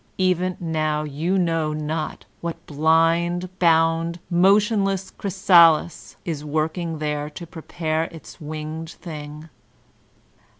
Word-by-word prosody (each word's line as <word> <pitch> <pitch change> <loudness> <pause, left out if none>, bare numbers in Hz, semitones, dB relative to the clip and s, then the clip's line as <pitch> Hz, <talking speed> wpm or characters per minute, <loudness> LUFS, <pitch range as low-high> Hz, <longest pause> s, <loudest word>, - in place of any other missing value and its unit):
Even 185 -1 +1
now 155 -2 -1
you 155 +6 -1
know 165 -4 0
not 155 +1 -4
what 170 -1 -6
blind, 165 +4 +2
bound, 165 0 +2
motionless 195 +1 +3
chrysalis 170 -5 +3
is 155 -4 -3
working 160 +2 -2
there 150 -1 -2
to 170 +3 -9
prepare 160 -1 -3
its 165 +1 -12
winged 155 +1 -6
thing. 150 -2 -9
165 Hz, 100 wpm, -23 LUFS, 155-175 Hz, -, motionless